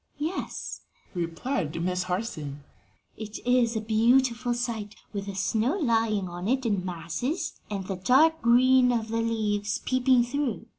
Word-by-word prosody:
"Yes," 315 +6 -4 0.3
replied 170 - -2
Miss 180 +1 0
Harson; 165 -7 -4 0.5
"it 215 -1 -6
is 245 -2 +3
a 220 - -1
beautiful 240 +2 +2
sight 225 -4 -4 0.2
with 200 -1 -4
the 200 - -5
snow 220 - +1
lying 225 - +1
on 175 +2 -5
it 260 +2 +1
in 200 -5 0
masses 215 - -3
and 200 -2 -4
the 190 -1 -4
dark 310 - +4
green 250 +1 +5
of 225 -2 -1
the 230 +1 0
leaves 210 -2 -1
peeping 255 -1 +3
through. 245 -2 -2
225 Hz, 145 wpm, -27 LUFS, 195-250 Hz, 0.5 s, green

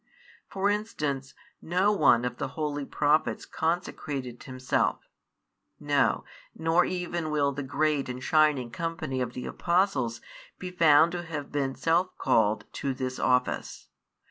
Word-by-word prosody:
For 200 +1 +1
instance, 150 -11 -3 0.3
no 185 +5 +2
one 140 - +4
of 125 0 -3
the - - -2
holy 145 -2 -2
Prophets 150 +2 +1
consecrated 145 -6 -3
himself; 130 -1 -1 0.7
no, - - +1 0.3
nor 165 +2 +2
even 175 -3 -3
will 145 -2 +1
the 140 +1 -5
great 145 +1 0
and 125 +1 -6
shining 150 -6 +3
company 155 -3 -3
of 125 -1 -3
the 125 - -6
Apostles 170 - 0 0.4
be 180 0 -6
found 165 -2 +5
to 175 0 -3
have 155 -4 -6
been 135 -2 -1
self 175 +3 +1
called 110 -1 +2
to 135 -2 -2
this 130 0 -4
office. 125 0 0
150 Hz, 135 wpm, -28 LUFS, 130-170 Hz, 0.7 s, found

